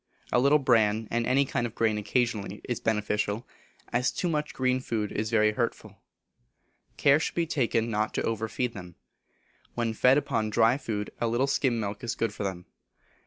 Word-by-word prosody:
A - - +4
little 140 +4 +5
bran, 110 -5 +2
and 120 0 0
any 140 +2 +3
kind 120 -2 -1
of 115 - -13
grain 110 -2 +1
occasionally 105 -2 -1
is 120 - -2
beneficial, 105 0 -1 0.5
as 125 +2 +2
too 180 - -2
much 150 -2 -1
green 130 0 +1
food 110 -5 -3
is 110 +1 -2
very 110 -2 +3
hurtful. 115 +2 -4 1.0
Care 140 +1 +5
should - - -3
be 170 - +1
taken 115 -7 0
not 110 0 0
to - - 0
over 110 -1 -1
feed 125 +1 -2
them. 90 -4 -10 0.8
When 115 -2 -1
fed 125 +5 +4
upon 115 -7 0
dry 115 +4 +3
food 105 -6 -4
a 120 - +2
little 120 +4 +1
skim 130 -3 +1
milk 105 0 -4
is 115 - -2
good 115 -2 -1
for 105 - -5
them. 95 -2 -4
115 Hz, 185 wpm, -28 LUFS, 105-125 Hz, 1.0 s, little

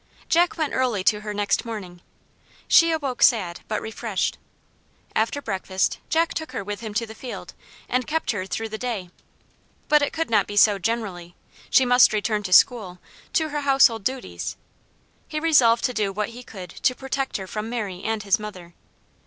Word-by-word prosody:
Jack 345 +1 +3
went 310 -3 -1
early 245 -7 0
to 210 +2 +2
her 210 0 -5
next 205 -1 0
morning. 190 -7 -7 0.7
She 335 0 +6
awoke 280 -6 -2
sad, 185 -9 +3
but 215 - -2
refreshed. 220 -2 -2 0.8
After 230 +6 0
breakfast 190 -2 -1
Jack 325 +1 +2
took 315 -5 -5
her 230 - -3
with 205 +1 -5
him 220 -2 -7
to 230 +1 0
the 220 - -10
field, 245 +2 -8 0.3
and 250 0 -1
kept 320 +1 0
her 190 -4 -4
through 225 +4 -3
the 220 0 -6
day. 215 -8 -4 0.8
But 300 0 +5
it 285 - 0
could 325 -5 -3
not 210 -3 +3
be 205 - -6
so 205 -1 +5
generally. 190 -5 -3 0.3
She 265 - +5
must 245 -2 +6
return 210 0 0
to 190 -3 -6
school, 185 -2 +4 0.4
to 315 -3 +1
her 295 0 -3
household 270 -6 +4
duties. 260 +3 -4 0.7
He 305 - -3
resolved 265 -8 +4
to 250 - +1
do 205 -4 0
what 210 +1 -2
he 240 +2 -10
could 185 -7 -10
to 255 - +2
protect 270 0 -3
her 190 - -6
from 210 +3 -5
Mary 205 -7 -4
and 220 -1 -2
his 200 +2 +2
mother. 185 -5 -9
225 Hz, 185 wpm, -24 LUFS, 200-260 Hz, 0.8 s, She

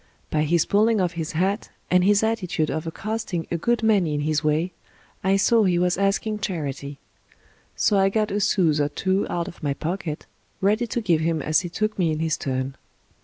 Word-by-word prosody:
By 155 0 +1
his 170 +1 +2
pulling 215 +2 +3
off 180 -2 +1
his 165 -3 -4
hat, 190 +6 0 0.2
and 180 0 +5
his 205 +2 +4
attitude 185 -8 0
of 160 +1 -3
accosting 195 -1 -3
a 170 - 0
good 235 +5 0
many 195 -9 +3
in 145 - -1
his 155 +1 0
way, 155 +4 +1 0.5
I 190 +1 +3
saw 225 +3 +4
he 180 -3 +2
was 180 0 +2
asking 200 +2 0
charity; 145 -7 -4 0.8
so 205 -2 +2
I 195 0 +4
got 215 +1 0
a 205 - 0
sous 175 -7 +2
or 145 - +1
two 190 +5 0
out 170 -1 -2
of - - -10
my 140 -3 -1
pocket, 160 -1 -4 0.3
ready 215 +5 +2
to 235 +2 -2
give 170 -7 +2
him 165 0 0
as 155 +1 +2
he 175 - -5
took 215 +4 -2
me 170 -3 +2
in 155 - -1
his 160 0 0
turn. 130 0 -3
180 Hz, 205 wpm, -24 LUFS, 155-205 Hz, 0.8 s, and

